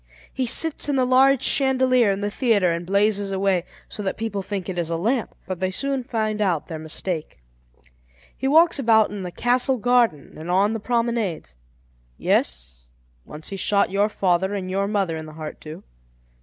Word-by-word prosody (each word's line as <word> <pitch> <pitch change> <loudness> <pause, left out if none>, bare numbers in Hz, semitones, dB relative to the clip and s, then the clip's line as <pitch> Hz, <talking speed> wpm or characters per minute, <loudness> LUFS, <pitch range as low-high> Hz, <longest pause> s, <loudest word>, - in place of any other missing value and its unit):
He 260 -2 -1
sits 315 +4 +2
in 285 - +1
the 260 -1 +2
large 260 +1 +4
chandelier 255 -4 +3
in 195 +1 -3
the 205 0 -2
theatre 210 -8 +2
and 170 +1 -4
blazes 200 0 +1
away, 190 -2 0 0.2
so - - -7
that 195 -2 -3
people 220 -3 -3
think 195 -1 -5
it 180 -2 -3
is 170 -1 -2
a 165 - -1
lamp; 230 +7 -1
but 185 -2 -5
they 185 0 0
soon 270 +6 -2
find 215 -3 -2
out 180 -7 0
their 160 -3 -7
mistake. 160 +1 -4 1.0
He 265 - -3
walks 320 +2 +4
about 220 -5 +4
in 205 -1 -6
the 180 - -5
castle 250 +6 +1
garden 235 - +1
and 160 +2 -7
on 195 +4 +2
the 225 - -3
promenades. 230 - -2 0.6
Yes, - - -1 0.4
once 155 +1 -8
he 195 - -5
shot 200 +1 +1
your 200 +2 +2
father 190 -1 0
and 185 -2 -4
your 195 +1 0
mother 195 -5 -1
in 160 0 -7
the 155 - -11
heart 155 -1 -7
too. 155 0 -9
200 Hz, 185 wpm, -23 LUFS, 180-240 Hz, 1.0 s, large